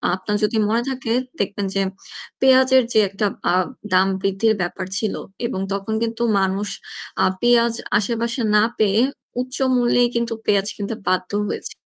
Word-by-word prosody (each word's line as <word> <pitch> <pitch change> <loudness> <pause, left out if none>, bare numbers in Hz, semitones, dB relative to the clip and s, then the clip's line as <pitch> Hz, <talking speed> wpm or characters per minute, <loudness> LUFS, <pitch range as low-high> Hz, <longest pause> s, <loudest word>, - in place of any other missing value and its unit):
আপনার 205 +2 -2
যদি 220 +1 +1
মনে 230 +2 +2
থাকে 260 -3 -3 0.3
দেখবেন 200 -1 -1
যে 195 - +2 0.6
পেঁয়াজের 260 -1 +5
যে 220 - +5
একটা 200 +2 -2 0.3
আ - - +2 0.4
দাম 190 +1 +5
বৃদ্ধির 195 +3 +2
ব্যাপার 185 +2 -3
ছিল 215 -3 -1 0.3
এবং 190 - -4
তখন 200 +2 -3
কিন্তু 230 +1 -2 0.2
মানুষ 195 +2 0 0.6
আ - - +5 0.2
পেঁয়াজ 235 -1 +4 0.2
আশেপাশে 235 +3 -1
না 210 - +6 0.2
পেয়ে 215 +1 +3 0.4
উচ্চ 255 +1 -6 0.2
মূল্যে 245 0 +3
কিন্তু 235 0 0
পেঁয়াজ 200 -1 +2
কিনতে 205 +2 -4
বাধ্য 185 +1 0 0.2
হয়েছি - - -5
220 Hz, 150 wpm, -21 LUFS, 195-235 Hz, 0.6 s, না